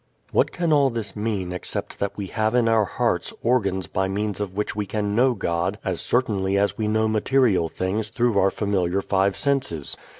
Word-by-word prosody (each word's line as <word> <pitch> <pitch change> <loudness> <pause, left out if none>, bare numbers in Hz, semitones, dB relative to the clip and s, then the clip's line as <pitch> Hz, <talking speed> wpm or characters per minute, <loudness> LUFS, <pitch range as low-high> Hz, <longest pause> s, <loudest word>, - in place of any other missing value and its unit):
What - - +2
can 170 -3 0
all 140 -2 +4
this 110 -5 -4
mean 105 -4 -2
except 90 - -5
that 100 - -2
we 100 - -3
have 110 +3 -1
in 120 -2 +3
our 110 -2 +3
hearts - - -1
organs 100 -7 +1
by 95 +4 -1
means 105 +1 -2
of 95 -2 -4
which 105 +1 -2
we 105 -1 -2
can 105 0 -2
know 125 +3 +3
God 85 +1 -1
as 95 -3 -1
certainly 100 -6 +1
as 100 0 +1
we 110 - -2
know 110 +1 +2
material 110 -5 +2
things 100 +5 -2
through 120 -4 +1
our 95 - +4
familiar 95 -2 0
five 95 0 +1
senses? 135 - -1
105 Hz, 195 wpm, -23 LUFS, 95-115 Hz, -, all